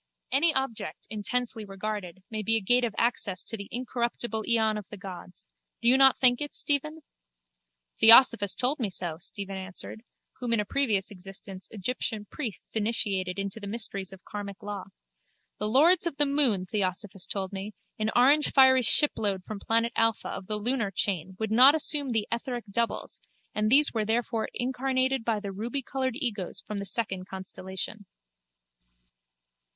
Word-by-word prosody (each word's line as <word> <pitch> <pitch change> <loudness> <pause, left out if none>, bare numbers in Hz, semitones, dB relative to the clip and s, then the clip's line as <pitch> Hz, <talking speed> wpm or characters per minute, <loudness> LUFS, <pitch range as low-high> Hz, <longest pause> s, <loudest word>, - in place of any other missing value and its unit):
Any 305 +5 +4
object, 265 -4 -3
intensely 225 +2 -2
regarded, 195 -2 -6
may 215 -1 -3
be 225 +2 +2
a - - +3
gate 245 +5 +3
of 230 -4 -2
access 220 -6 0
to - - -3
the 200 -2 -8
incorruptible 235 -2 -3
eon 220 -2 +3
of 210 -3 -7
the 210 - -9
gods. 185 -2 -10 0.3
Do 235 - 0
you 250 - +7
not 265 0 +6
think 245 0 +4
it, 290 - -4
Stephen? 305 +2 -1 1.0
Theosophos 225 -3 +8
told 265 +4 0
me 225 -5 -1
so, 175 -3 -3
Stephen 195 0 -5
answered, 190 +3 -8 0.4
whom 245 -2 -1
in 230 - +3
a 210 - -1
previous 215 -6 0
existence 195 0 -9
Egyptian 215 0 -3
priests 230 - -7
initiated 200 -4 -1
into 200 +2 -4
the 205 - -7
mysteries 200 -3 -3
of 190 -1 -14
karmic 200 0 -8
law. 205 -2 -6 0.7
The 210 - -2
lords 330 +8 +4
of 285 - -5
the 295 - +4
moon, 275 -10 +2
Theosophos 195 -1 -2
told 195 -1 -4
me, 200 +2 -6 0.3
an 215 0 0
orangefiery 265 0 +5
shipload 210 -7 +4
from 215 +1 -7
planet 230 +3 0
Alpha 225 -1 +1
of 185 - -7
the 215 - -2
lunar 230 0 -1
chain 190 -1 -1
would 220 0 -3
not 255 +6 +8
assume 295 -2 -1
the 220 -3 -1
etheric 240 0 -4
doubles 235 +3 -2 0.3
and 215 0 0
these 285 +4 +4
were 220 -2 0
therefore 225 0 -1
incarnated 260 0 0
by 225 -2 0
the 205 -1 -6
rubycoloured 260 +4 -3
egos 220 - -2
from 210 -1 -6
the 200 - -5
second 195 -3 -2
constellation. 190 +2 -6
220 Hz, 160 wpm, -27 LUFS, 200-250 Hz, 1.0 s, Theosophos